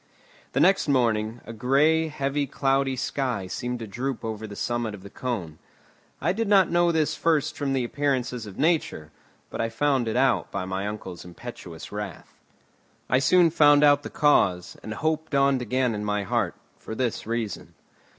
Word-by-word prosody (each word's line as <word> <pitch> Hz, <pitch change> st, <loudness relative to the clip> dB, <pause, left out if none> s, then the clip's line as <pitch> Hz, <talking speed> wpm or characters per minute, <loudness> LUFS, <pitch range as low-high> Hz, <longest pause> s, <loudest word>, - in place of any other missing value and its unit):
The -, -, +1 dB
next 195 Hz, -3 st, +4 dB
morning, 115 Hz, -4 st, +1 dB
a 115 Hz, -, -8 dB
grey, 145 Hz, +8 st, +3 dB
heavy, 140 Hz, -1 st, -2 dB
cloudy 135 Hz, -1 st, +1 dB
sky 125 Hz, -5 st, -2 dB
seemed 125 Hz, +6 st, -4 dB
to 115 Hz, -, -6 dB
droop 125 Hz, +4 st, -4 dB
over 110 Hz, 0 st, -4 dB
the 100 Hz, -, -9 dB
summit 120 Hz, -2 st, -2 dB
of 95 Hz, -, -14 dB
the 100 Hz, -, -11 dB
cone. 95 Hz, -12 st, -4 dB, 0.6 s
I -, -, +1 dB
did 225 Hz, +2 st, -1 dB
not 195 Hz, -4 st, +5 dB
know 175 Hz, 0 st, +3 dB
this 160 Hz, -2 st, +1 dB
first 155 Hz, -2 st, +1 dB
from 140 Hz, -2 st, -1 dB
the 130 Hz, -2 st, +1 dB
appearances 125 Hz, -3 st, -1 dB
of 100 Hz, -, -10 dB
nature, 150 Hz, -, 0 dB, 0.4 s
but -, -, -3 dB
I 115 Hz, -, 0 dB
found 130 Hz, +1 st, +1 dB
it 110 Hz, -, -2 dB
out 130 Hz, -1 st, +2 dB
by 95 Hz, -, -3 dB
my 95 Hz, +2 st, -3 dB
uncle's 95 Hz, -4 st, -6 dB
impetuous 90 Hz, -2 st, -9 dB
wrath. 105 Hz, -5 st, -7 dB, 0.8 s
I 130 Hz, -, +5 dB
soon 170 Hz, +5 st, +4 dB
found 145 Hz, -2 st, +5 dB
out 145 Hz, -1 st, +6 dB
the -, -, -7 dB
cause, 90 Hz, -, +2 dB
and 110 Hz, -, -6 dB
hope 160 Hz, +2 st, -1 dB
dawned 140 Hz, -2 st, +2 dB
again 125 Hz, 0 st, 0 dB
in 105 Hz, 0 st, -4 dB
my 105 Hz, -1 st, -1 dB
heart. 95 Hz, -, -1 dB, 0.2 s
For 110 Hz, -, -7 dB
this 120 Hz, -3 st, -2 dB
reason. 115 Hz, -4 st, -4 dB
125 Hz, 180 wpm, -25 LUFS, 110-145 Hz, 0.8 s, out